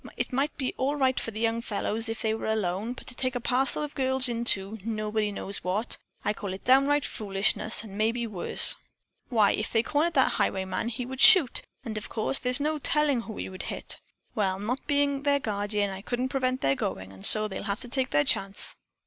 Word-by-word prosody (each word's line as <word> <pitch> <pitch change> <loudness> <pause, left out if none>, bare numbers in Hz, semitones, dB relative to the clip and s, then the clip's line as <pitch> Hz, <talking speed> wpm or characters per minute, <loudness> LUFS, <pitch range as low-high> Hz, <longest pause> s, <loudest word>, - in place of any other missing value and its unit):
It - - -3
might 280 +4 -1
be 260 -3 -2
all 275 +3 0
right 260 -3 +1
for - - -4
the 215 -1 -7
young 230 0 0
fellows 225 +1 -2
if 225 +1 -5
they 220 -1 +1
were 220 - -4
alone, 215 +1 -2
but - - -12
to - - -7
take 255 +1 -2
a - - -1
parcel 255 +4 0
of 295 - -6
girls 265 -1 +2
into, 225 -3 +1
nobody 215 -1 -2
knows 200 0 -6
what, 195 +6 -1 0.3
I 210 - +1
call 200 -2 -6
it 190 - -13
downright 275 +3 +4
foolishness 205 +2 0
and 200 -3 -10
maybe 230 +3 0
worse. 205 -6 +4 0.5
Why, 220 -5 +3
if 215 - -3
they 225 -1 +2
cornered 305 +7 0
that 265 - +4
highwayman, 190 +4 -1
he 240 +1 -4
would 265 +1 -6
shoot, 360 - +7 0.2
of 215 -2 -5
course, 225 +4 +2
and - - -15
there's 250 +1 +4
no 305 +1 -1
tellin' 290 -3 +2
who 220 -2 -8
he - - -5
would 185 0 -8
hit. - - 0 0.3
Well, 195 -5 -1
not 230 +7 -4
being 285 -1 +1
their 285 0 +2
guardeen, 205 -3 -2
I 190 0 -7
couldn't 245 +4 -3
prevent 255 -1 -1
their 135 - +2
goin', 95 -6 -4
and 95 0 -14
so 215 - +7
they'll 195 0 -7
have 200 - -2
to 250 - -6
take 260 +1 -2
their 145 0 +2
chance." 195 +5 -1
230 Hz, 215 wpm, -27 LUFS, 205-260 Hz, 0.5 s, shoot